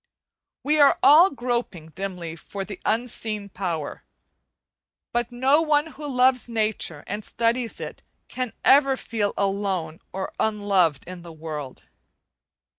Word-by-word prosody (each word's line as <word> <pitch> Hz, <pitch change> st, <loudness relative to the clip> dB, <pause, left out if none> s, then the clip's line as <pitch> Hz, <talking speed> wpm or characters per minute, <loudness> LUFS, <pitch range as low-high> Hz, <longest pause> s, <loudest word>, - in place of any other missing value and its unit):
We 300 Hz, +2 st, +2 dB
are 285 Hz, -1 st, +6 dB
all 310 Hz, +7 st, +8 dB
groping 240 Hz, -, -3 dB
dimly 175 Hz, -1 st, -5 dB
for 195 Hz, +4 st, -7 dB
the 200 Hz, -2 st, -8 dB
Unseen 220 Hz, -2 st, -2 dB
Power, 170 Hz, -6 st, -4 dB, 1.1 s
but 240 Hz, 0 st, -1 dB
no 265 Hz, +5 st, +3 dB
one 305 Hz, 0 st, +1 dB
who 295 Hz, 0 st, -7 dB
loves 255 Hz, -2 st, +2 dB
nature 215 Hz, -9 st, -1 dB
and 210 Hz, -, -5 dB
studies 230 Hz, +2 st, -1 dB
it -, -, -7 dB, 0.3 s
can 255 Hz, -2 st, -4 dB
ever 275 Hz, -1 st, +5 dB
feel 215 Hz, -5 st, -2 dB
alone 195 Hz, -5 st, -1 dB
or 190 Hz, 0 st, -5 dB
unloved 200 Hz, -8 st, +2 dB
in 180 Hz, -1 st, -8 dB
the 170 Hz, -1 st, -10 dB
world. 155 Hz, -4 st, -7 dB
215 Hz, 125 wpm, -24 LUFS, 180-255 Hz, 1.1 s, all